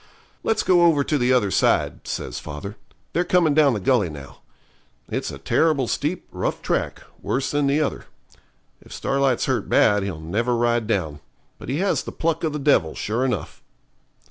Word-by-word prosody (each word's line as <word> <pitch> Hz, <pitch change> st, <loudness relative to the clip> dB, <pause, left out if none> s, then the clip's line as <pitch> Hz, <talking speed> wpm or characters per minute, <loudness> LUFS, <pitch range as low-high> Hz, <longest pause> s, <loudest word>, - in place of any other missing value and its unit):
'Let's 225 Hz, -, 0 dB
go 180 Hz, -2 st, +4 dB
over 165 Hz, -4 st, +4 dB
to 150 Hz, -, 0 dB
the 125 Hz, +1 st, +2 dB
other 110 Hz, -6 st, +2 dB
side,' -, -, +1 dB
says -, -, -4 dB
father; 75 Hz, +8 st, -7 dB, 0.4 s
'they're 175 Hz, -, +2 dB
coming 175 Hz, -4 st, +3 dB
down 145 Hz, -4 st, +4 dB
the -, -, -2 dB
gully 100 Hz, -2 st, +2 dB
now. 70 Hz, -3 st, -11 dB, 0.7 s
It's -, -, -2 dB
a 70 Hz, -, -7 dB
terrible 140 Hz, -, +1 dB
steep, 155 Hz, +9 st, -2 dB
rough -, -, -3 dB
track, -, -, -2 dB, 0.2 s
worse 135 Hz, +1 st, -1 dB
than 145 Hz, -1 st, +1 dB
the 145 Hz, +3 st, +2 dB
other. 150 Hz, -, -2 dB, 0.8 s
If -, -, -18 dB
Starlight's 135 Hz, -2 st, 0 dB
hurt -, -, -1 dB
bad 105 Hz, 0 st, +4 dB
he'll 95 Hz, -5 st, -4 dB
never 110 Hz, +10 st, -1 dB
ride 120 Hz, -1 st, +1 dB
down. 85 Hz, -9 st, -1 dB, 0.4 s
But -, -, -9 dB
he 135 Hz, -, -1 dB
has 200 Hz, -, +1 dB
the -, -, -7 dB
pluck 165 Hz, 0 st, -1 dB
of 160 Hz, -, 0 dB
the 150 Hz, -, -3 dB
devil, 135 Hz, -, +2 dB
sure 115 Hz, +4 st, -1 dB
enough.' 130 Hz, -1 st, -3 dB
130 Hz, 180 wpm, -23 LUFS, 105-150 Hz, 0.8 s, go